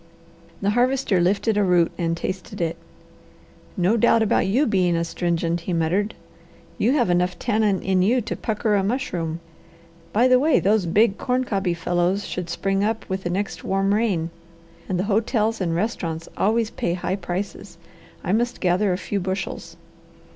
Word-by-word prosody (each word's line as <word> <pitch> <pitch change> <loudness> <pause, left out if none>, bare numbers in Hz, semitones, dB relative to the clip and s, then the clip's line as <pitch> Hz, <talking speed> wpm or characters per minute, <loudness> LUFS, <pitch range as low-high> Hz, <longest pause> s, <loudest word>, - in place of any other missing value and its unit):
The 200 - +2
Harvester 245 -4 +2
lifted 200 +4 +1
a 205 - +3
root 175 -3 +3
and 165 -1 -1
tasted 185 +2 -5
it. 165 -1 -1 1.0
"No 190 +5 +2
doubt 230 0 +4
about 205 - +2
you 250 +10 +2
being 185 -7 +2
astringent," 170 0 -1
he 175 +2 -4
muttered. 175 +6 0 0.6
"You 240 +5 +3
have 240 -11 +2
enough 180 0 +1
tannin 215 -4 +1
in 190 -1 +2
you 230 +7 +3
to 225 - -4
pucker 215 0 -1
a 200 -1 +2
mushroom. 175 -8 -2 0.7
By 235 +4 +4
the 255 0 +5
way, 300 +2 +3
those 200 -2 +2
big, 205 +4 +3
corn 255 0 0
cobby 195 -7 -1
fellows 175 +3 0
should 180 -2 -4
spring 195 +3 0
up 220 +1 -1
with 190 0 -2
the - - 0
next 195 +3 -3
warm 195 +1 +1
rain, 195 -7 0 0.6
and 185 - 0
the 180 - 0
hotels 220 +1 0
and 170 -3 0
restaurants 170 -5 -2
always 225 +2 +1
pay 175 - -2
high 185 +1 -2
prices. 190 +1 -5 0.5
I - - -1
must 240 +4 0
gather 185 +2 +2
a 180 - 0
few 200 +1 -3
bushels." 190 +1 -4
195 Hz, 170 wpm, -23 LUFS, 175-220 Hz, 1.0 s, the